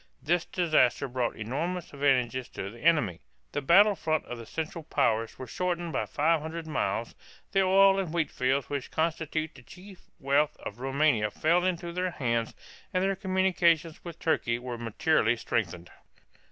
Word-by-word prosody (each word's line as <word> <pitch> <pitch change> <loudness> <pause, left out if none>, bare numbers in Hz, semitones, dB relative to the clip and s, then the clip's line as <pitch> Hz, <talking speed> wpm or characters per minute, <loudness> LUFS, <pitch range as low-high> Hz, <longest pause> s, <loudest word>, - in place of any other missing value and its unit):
This 175 +2 +1
disaster 155 -7 +2
brought 125 -1 -2
enormous 160 +12 -4
advantages 130 -3 +1
to 95 - -6
the 120 - -13
enemy. 150 - +2 0.3
The 145 - -2
battle 200 +9 +6
front 155 -4 -1
of 120 - -7
the 115 - -10
Central 160 +1 -5
Powers 115 -6 0
was 130 -3 -8
shortened 175 -2 -2
by - - -1
five 160 +1 +1
hundred 160 +1 -6
miles, 155 -4 -2 0.4
the 195 0 +3
oil 195 +1 +5
and 185 -5 -2
wheat 170 -2 -1
fields 130 +2 0
which 140 -2 -4
constitute 160 -1 -2
the - - -14
chief 185 +8 -14 0.2
wealth 145 +1 +1
of 105 - -8
Roumania 135 -4 +2
fell 170 - +2
into 175 -2 -1
their 180 +1 -1
hands, 115 -8 -2 0.4
and 185 0 +1
their 195 0 +1
communications 180 -4 +1
with 170 -2 -8
Turkey 125 -8 0
were 120 0 -6
materially 115 +1 +1
strengthened. 90 -7 -3
155 Hz, 165 wpm, -28 LUFS, 125-175 Hz, 0.4 s, battle